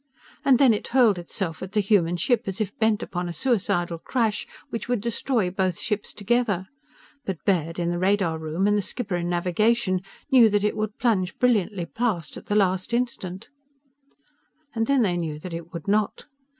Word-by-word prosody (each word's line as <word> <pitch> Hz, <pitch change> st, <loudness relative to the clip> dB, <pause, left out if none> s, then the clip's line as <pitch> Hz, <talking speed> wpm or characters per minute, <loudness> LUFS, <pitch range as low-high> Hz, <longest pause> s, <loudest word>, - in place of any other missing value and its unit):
And 270 Hz, -3 st, +5 dB
then 260 Hz, -3 st, +6 dB
it 210 Hz, -, -3 dB
hurled 235 Hz, -7 st, +4 dB
itself 170 Hz, -1 st, -4 dB
at 190 Hz, +1 st, -7 dB
the 215 Hz, -, +2 dB
human 190 Hz, -4 st, +2 dB
ship 240 Hz, +5 st, +1 dB
as 195 Hz, +2 st, -4 dB
if 205 Hz, -2 st, -2 dB
bent 220 Hz, -1 st, +2 dB
upon 175 Hz, 0 st, -4 dB
a -, -, -3 dB
suicidal 175 Hz, -8 st, 0 dB
crash 225 Hz, +1 st, -1 dB, 0.2 s
which 230 Hz, -, -4 dB
would 245 Hz, -2 st, +1 dB
destroy 230 Hz, -2 st, 0 dB
both 185 Hz, -2 st, 0 dB
ships 210 Hz, -2 st, -3 dB
together. 205 Hz, -3 st, 0 dB, 0.6 s
But 190 Hz, -8 st, -5 dB
Baird, 165 Hz, -4 st, +1 dB
in 170 Hz, -1 st, 0 dB
the 175 Hz, -, -2 dB
radar 185 Hz, -4 st, +1 dB
room, 160 Hz, +4 st, -1 dB
and 205 Hz, 0 st, +3 dB
the 205 Hz, -, +2 dB
skipper 200 Hz, -2 st, -3 dB
in 175 Hz, 0 st, -2 dB
navigation, 185 Hz, +3 st, +1 dB, 0.3 s
knew 245 Hz, -4 st, +7 dB
that 205 Hz, -1 st, +1 dB
it 210 Hz, -, +1 dB
would 215 Hz, 0 st, -3 dB
plunge 190 Hz, -7 st, 0 dB
brilliantly 210 Hz, -7 st, +1 dB
past 200 Hz, -8 st, -2 dB
at -, -, -10 dB
the 205 Hz, -, 0 dB
last 190 Hz, +2 st, +2 dB
instant 225 Hz, -5 st, -3 dB, 1.2 s
And 225 Hz, -2 st, 0 dB
then 275 Hz, -3 st, +3 dB
they 180 Hz, -4 st, +1 dB
knew 160 Hz, -3 st, -3 dB
that 170 Hz, +3 st, -8 dB
it 170 Hz, 0 st, -7 dB
would 170 Hz, -1 st, -7 dB
not. 210 Hz, +1 st, 0 dB
200 Hz, 190 wpm, -25 LUFS, 175-225 Hz, 1.2 s, knew